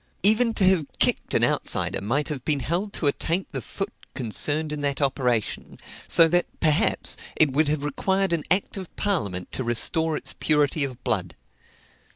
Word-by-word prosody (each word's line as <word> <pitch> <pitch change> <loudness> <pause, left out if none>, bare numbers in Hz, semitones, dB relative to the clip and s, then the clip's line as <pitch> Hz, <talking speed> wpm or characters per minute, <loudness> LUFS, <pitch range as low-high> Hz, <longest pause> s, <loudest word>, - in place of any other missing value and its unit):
Even 220 +3 +4
to 200 - +2
have 185 -6 +3
kicked - - +2
an - - +3
outsider - - 0
might 135 +10 -1
have 140 -5 -5
been 145 -3 0
held 180 +8 -2
to 170 - -3
attaint 165 +5 -1
the 135 -4 -4
foot - - -5 0.2
concerned 150 +7 -1
in 150 -1 -4
that 140 -1 -1
operation; 130 -5 -1 0.3
so 165 - +6
that, 175 +2 +1
perhaps, 155 -3 +1 0.2
it 155 -3 +3
would 150 +2 +2
have 150 -1 -1
required 190 +6 0
an 165 - 0
act 190 +3 +1
of 185 -3 -7
parliament 100 - -2
to 130 - -2
restore 155 +7 +1
its - - -3
purity 150 -1 +1
of 130 -2 -6
blood. 90 -6 -2
150 Hz, 175 wpm, -24 LUFS, 135-175 Hz, 0.3 s, so